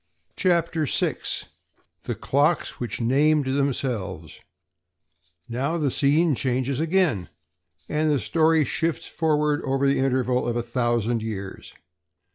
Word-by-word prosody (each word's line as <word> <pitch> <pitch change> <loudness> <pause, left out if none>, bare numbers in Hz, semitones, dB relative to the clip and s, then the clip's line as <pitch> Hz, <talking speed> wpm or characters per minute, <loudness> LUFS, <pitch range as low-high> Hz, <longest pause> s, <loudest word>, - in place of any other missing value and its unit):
CHAPTER 170 -4 +1
SIX - - -1 0.6
The - - -2
Clocks 145 +5 0
Which 120 - -4
Named 145 +5 +3
Themselves 125 - -2 1.1
Now 135 +8 -1
the 145 -5 0
scene 150 +5 +3
changes 130 +1 -1
again, 160 - +1 0.6
and 155 +1 0
the 145 - +3
story 155 - +2
shifts 165 +5 -1
forward 150 -2 +1
over 135 0 0
the 140 - +2
interval 130 -2 +1
of 120 - -1
a 120 - -1
thousand 120 -1 0
years. 100 -3 -6
135 Hz, 115 wpm, -24 LUFS, 120-155 Hz, 1.1 s, Named